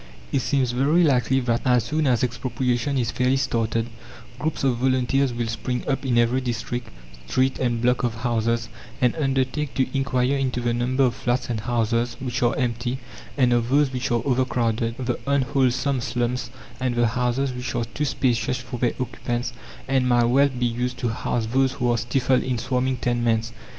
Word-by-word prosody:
It -, -, +2 dB
seems 130 Hz, -1 st, +1 dB
very 145 Hz, +8 st, +3 dB
likely 135 Hz, -3 st, +3 dB
that, 120 Hz, -1 st, 0 dB
as 125 Hz, -2 st, +3 dB
soon 155 Hz, -1 st, 0 dB
as 125 Hz, -2 st, +2 dB
expropriation 125 Hz, +2 st, -1 dB
is 120 Hz, -2 st, 0 dB
fairly 125 Hz, +3 st, +2 dB
started, 115 Hz, -3 st, 0 dB, 0.5 s
groups 155 Hz, +1 st, -2 dB
of 130 Hz, -3 st, +2 dB
volunteers 130 Hz, +1 st, +2 dB
will 120 Hz, 0 st, -2 dB
spring 125 Hz, +2 st, -3 dB
up 135 Hz, -1 st, 0 dB
in 125 Hz, -3 st, +1 dB
every 120 Hz, +2 st, +3 dB
district, 120 Hz, 0 st, -3 dB, 0.4 s
street, 130 Hz, -, +1 dB
and 120 Hz, -2 st, 0 dB
block 125 Hz, +1 st, +3 dB
of 120 Hz, -2 st, 0 dB
houses, 115 Hz, 0 st, 0 dB, 0.3 s
and 125 Hz, +2 st, +2 dB
undertake 135 Hz, -1 st, -1 dB
to 130 Hz, -, +2 dB
inquire 135 Hz, -1 st, +1 dB
into 130 Hz, -3 st, -1 dB
the 120 Hz, -1 st, 0 dB
number 125 Hz, +3 st, +1 dB
of 125 Hz, -2 st, +3 dB
flats 120 Hz, 0 st, -1 dB
and 110 Hz, -, -2 dB
houses 120 Hz, +1 st, 0 dB
which 125 Hz, -1 st, -3 dB
are 120 Hz, +1 st, +2 dB
empty 120 Hz, 0 st, -1 dB, 0.4 s
and 125 Hz, -3 st, +4 dB
of 120 Hz, 0 st, +1 dB
those 140 Hz, 0 st, +3 dB
which 125 Hz, 0 st, -2 dB
are 120 Hz, -2 st, +1 dB
overcrowded, 120 Hz, -3 st, 0 dB
the 125 Hz, -2 st, -2 dB
unwholesome 135 Hz, -1 st, +1 dB
slums, 120 Hz, +1 st, -2 dB, 0.3 s
and 125 Hz, -2 st, -1 dB
the 120 Hz, -1 st, +3 dB
houses 125 Hz, +3 st, 0 dB
which 125 Hz, 0 st, -4 dB
are 120 Hz, -1 st, 0 dB
too 145 Hz, +5 st, -3 dB
spacious 125 Hz, -3 st, 0 dB
for 125 Hz, 0 st, -7 dB
their 120 Hz, -1 st, +1 dB
occupants 120 Hz, -1 st, -3 dB, 0.3 s
and 130 Hz, -1 st, +2 dB
might 120 Hz, -1 st, +4 dB
well 135 Hz, +4 st, +4 dB
be 125 Hz, -2 st, -2 dB
used 125 Hz, +1 st, -2 dB
to 120 Hz, -, -1 dB
house 115 Hz, +1 st, -1 dB
those 130 Hz, +3 st, +1 dB
who 125 Hz, -2 st, 0 dB
are 120 Hz, -, +2 dB
stifled 125 Hz, +2 st, +1 dB
in 130 Hz, -1 st, -1 dB
swarming 125 Hz, +2 st, 0 dB
tenements. 120 Hz, -1 st, 0 dB
125 Hz, 185 wpm, -24 LUFS, 120-130 Hz, 0.5 s, and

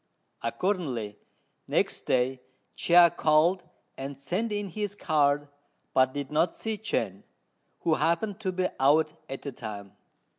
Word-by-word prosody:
Accordingly, 130 Hz, -, -2 dB, 0.5 s
next -, -, 0 dB
day 130 Hz, 0 st, +1 dB, 0.3 s
Chia 170 Hz, -1 st, +6 dB
called 160 Hz, +5 st, +3 dB, 0.4 s
and 135 Hz, 0 st, -5 dB
sent 185 Hz, +11 st, -2 dB
in 205 Hz, -1 st, -2 dB
his 205 Hz, +2 st, -3 dB
card, 145 Hz, -5 st, +2 dB, 0.5 s
but 130 Hz, 0 st, +4 dB
did 140 Hz, -1 st, -4 dB
not 165 Hz, +3 st, +2 dB
see 220 Hz, -1 st, -3 dB
Chên, 105 Hz, -, -2 dB, 0.6 s
who 165 Hz, -, +2 dB
happened 175 Hz, +6 st, 0 dB
to 190 Hz, -4 st, -1 dB
be 185 Hz, 0 st, 0 dB
out 155 Hz, +3 st, +4 dB, 0.2 s
at 135 Hz, -, -6 dB
the 140 Hz, -, -4 dB
time. 100 Hz, -5 st, -7 dB
155 Hz, 135 wpm, -28 LUFS, 135-185 Hz, 0.6 s, Chia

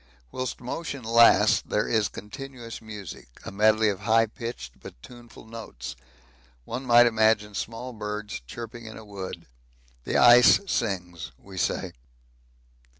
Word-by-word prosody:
Whilst 130 Hz, -1 st, -4 dB
motion 140 Hz, +1 st, -5 dB
lasts 115 Hz, +1 st, +5 dB
there 105 Hz, -, -1 dB
is 110 Hz, -3 st, +1 dB
continuous 120 Hz, +2 st, -9 dB
music, 105 Hz, -, -10 dB
a -, -, -6 dB
medley 110 Hz, +2 st, +3 dB
of 100 Hz, -3 st, -1 dB
high 115 Hz, 0 st, +3 dB
pitched 115 Hz, -, -8 dB
but -, -, -12 dB
tuneful 120 Hz, -2 st, -14 dB
notes 65 Hz, -, -8 dB, 0.7 s
one 125 Hz, +3 st, -6 dB
might 120 Hz, 0 st, +7 dB
imagine 110 Hz, -2 st, +2 dB
small 115 Hz, +5 st, -5 dB
birds 105 Hz, -1 st, -5 dB
chirping 115 Hz, -, -8 dB
in 110 Hz, -, -9 dB
a 110 Hz, -, -11 dB
wood. 95 Hz, -4 st, -8 dB, 0.6 s
The -, -, 0 dB
ice 120 Hz, 0 st, +7 dB
sings, 90 Hz, -, -3 dB
we 95 Hz, +6 st, -14 dB
say. -, -, -1 dB
110 Hz, 135 wpm, -26 LUFS, 105-120 Hz, 0.7 s, might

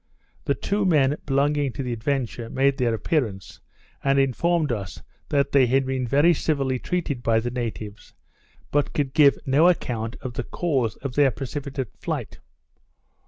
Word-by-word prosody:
The -, -, +1 dB
two 205 Hz, +1 st, -1 dB
men 150 Hz, -6 st, +3 dB
belonging 140 Hz, -1 st, +1 dB
to 135 Hz, -, -4 dB
the 125 Hz, -1 st, -3 dB
Adventure 120 Hz, -1 st, -2 dB
made 135 Hz, +1 st, +1 dB
their 120 Hz, -3 st, +2 dB
appearance, 110 Hz, -, -2 dB, 0.4 s
and 135 Hz, 0 st, +2 dB
informed 150 Hz, +3 st, +1 dB
us 100 Hz, -7 st, -5 dB, 0.3 s
that 140 Hz, -1 st, +1 dB
they 135 Hz, -3 st, +5 dB
had 135 Hz, +2 st, +2 dB
been 130 Hz, -1 st, -2 dB
very 145 Hz, +8 st, +4 dB
civilly 135 Hz, -5 st, -1 dB
treated 160 Hz, -7 st, -2 dB
by 115 Hz, -1 st, +2 dB
the 120 Hz, +2 st, -3 dB
natives, 110 Hz, -4 st, -6 dB, 0.6 s
but 145 Hz, 0 st, +1 dB
could 140 Hz, -3 st, -1 dB
give 145 Hz, -2 st, +5 dB
no 145 Hz, +6 st, +5 dB
account 115 Hz, -9 st, -2 dB
of 130 Hz, -, -5 dB
the -, -, -3 dB
cause 135 Hz, -, -1 dB
of 135 Hz, -3 st, -3 dB
their 145 Hz, 0 st, +4 dB
precipitate 135 Hz, -1 st, -5 dB
flight. -, -, -4 dB
135 Hz, 160 wpm, -24 LUFS, 120-145 Hz, 0.6 s, they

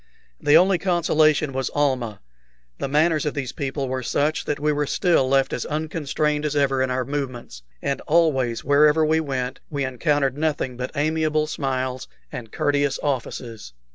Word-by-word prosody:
The 145 Hz, +2 st, +5 dB
only 185 Hz, +1 st, +4 dB
consolation 155 Hz, -5 st, +2 dB
was 130 Hz, -1 st, -2 dB
Almah. 130 Hz, -8 st, 0 dB, 0.6 s
The -, -, -2 dB
manners 155 Hz, +2 st, +2 dB
of 150 Hz, -, -2 dB
these 135 Hz, -4 st, -3 dB
people 140 Hz, 0 st, -3 dB
were 130 Hz, 0 st, -2 dB
such 145 Hz, +5 st, 0 dB
that 150 Hz, -1 st, -2 dB
we 150 Hz, +1 st, +1 dB
were 145 Hz, -1 st, -1 dB
still 165 Hz, -8 st, +2 dB
left 135 Hz, 0 st, +2 dB
as -, -, -2 dB
unconstrained 150 Hz, -1 st, -1 dB
as 150 Hz, -1 st, -1 dB
ever 135 Hz, -2 st, +2 dB
in 130 Hz, -, +1 dB
our 125 Hz, 0 st, -1 dB
movements, 130 Hz, -, -5 dB, 0.2 s
and 140 Hz, 0 st, -1 dB
always, 140 Hz, -8 st, +2 dB
wherever 150 Hz, +3 st, +4 dB
we 160 Hz, +1 st, +2 dB
went, 130 Hz, -4 st, -3 dB
we 140 Hz, -3 st, -2 dB
encountered 140 Hz, +1 st, 0 dB
nothing 150 Hz, -5 st, -1 dB
but 125 Hz, +1 st, -4 dB
amiable 155 Hz, +1 st, +1 dB
smiles 130 Hz, -4 st, -3 dB, 0.2 s
and 115 Hz, -3 st, -7 dB
courteous 145 Hz, -1 st, +1 dB
offices. 120 Hz, -, -4 dB
145 Hz, 165 wpm, -23 LUFS, 130-155 Hz, 0.6 s, The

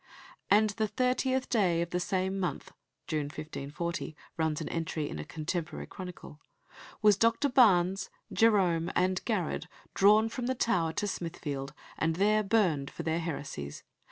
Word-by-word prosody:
"And 210 Hz, +1 st, +5 dB
the 215 Hz, +1 st, -1 dB
thirtieth 255 Hz, +3 st, 0 dB
day 185 Hz, -8 st, +2 dB
of 170 Hz, -, -8 dB
the 180 Hz, -, 0 dB
same 190 Hz, +1 st, -1 dB
month," 175 Hz, -7 st, -3 dB, 0.3 s
June 155 Hz, -2 st, -1 dB
1540, 155 Hz, +2 st, -5 dB, 0.2 s
runs 160 Hz, -2 st, 0 dB
an -, -, -4 dB
entry 160 Hz, -2 st, -2 dB
in 75 Hz, -, -6 dB
a -, -, -4 dB
contemporary 160 Hz, -, -4 dB
chronicle, 180 Hz, -5 st, -9 dB, 0.6 s
"was 210 Hz, -1 st, +7 dB
Dr. 230 Hz, +6 st, +3 dB
Barnes, 195 Hz, -7 st, +4 dB, 0.2 s
Jerome, 185 Hz, -7 st, +3 dB
and 185 Hz, 0 st, +1 dB
Garrard, 205 Hz, -8 st, -1 dB, 0.3 s
drawn 210 Hz, +3 st, +5 dB
from 240 Hz, +2 st, -4 dB
the 260 Hz, -, 0 dB
Tower 175 Hz, -9 st, +1 dB
to 205 Hz, +3 st, -1 dB
Smithfield, 150 Hz, -7 st, -4 dB, 0.2 s
and 160 Hz, 0 st, +1 dB
there 210 Hz, +4 st, +3 dB
burned 195 Hz, -10 st, +1 dB
for -, -, -7 dB
their 160 Hz, +1 st, 0 dB
heresies. 140 Hz, -, -5 dB
180 Hz, 150 wpm, -30 LUFS, 160-210 Hz, 0.6 s, was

